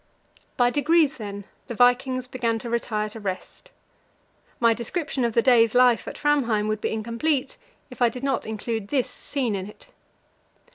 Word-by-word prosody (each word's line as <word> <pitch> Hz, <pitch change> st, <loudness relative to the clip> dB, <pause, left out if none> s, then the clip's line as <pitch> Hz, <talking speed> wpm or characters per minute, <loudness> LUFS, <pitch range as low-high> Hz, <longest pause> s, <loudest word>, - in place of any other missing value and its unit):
By 245 Hz, -1 st, +3 dB
degrees, 305 Hz, +1 st, +2 dB
then, 200 Hz, -3 st, -7 dB, 0.2 s
the 240 Hz, -, -5 dB
vikings 250 Hz, +2 st, +3 dB
began 240 Hz, -3 st, -1 dB
to 230 Hz, +1 st, -6 dB
retire 215 Hz, -2 st, -1 dB
to 225 Hz, -, -9 dB
rest. 195 Hz, -, -6 dB, 0.9 s
My 230 Hz, -1 st, +4 dB
description 270 Hz, +4 st, -3 dB
of 235 Hz, -1 st, 0 dB
the 235 Hz, -, +3 dB
day's 230 Hz, -3 st, +4 dB
life 250 Hz, -2 st, +4 dB
at -, -, -6 dB
Framheim 240 Hz, -8 st, +1 dB
would 215 Hz, 0 st, -2 dB
be -, -, -1 dB
incomplete 235 Hz, +6 st, -1 dB, 0.4 s
if 250 Hz, -, -12 dB
I 240 Hz, -, +5 dB
did 250 Hz, +3 st, -9 dB
not 270 Hz, -5 st, -1 dB
include 220 Hz, -1 st, -4 dB
this 260 Hz, +2 st, 0 dB
scene 260 Hz, -6 st, -3 dB
in 195 Hz, 0 st, -4 dB
it. 355 Hz, -, -16 dB
240 Hz, 170 wpm, -24 LUFS, 220-260 Hz, 0.9 s, I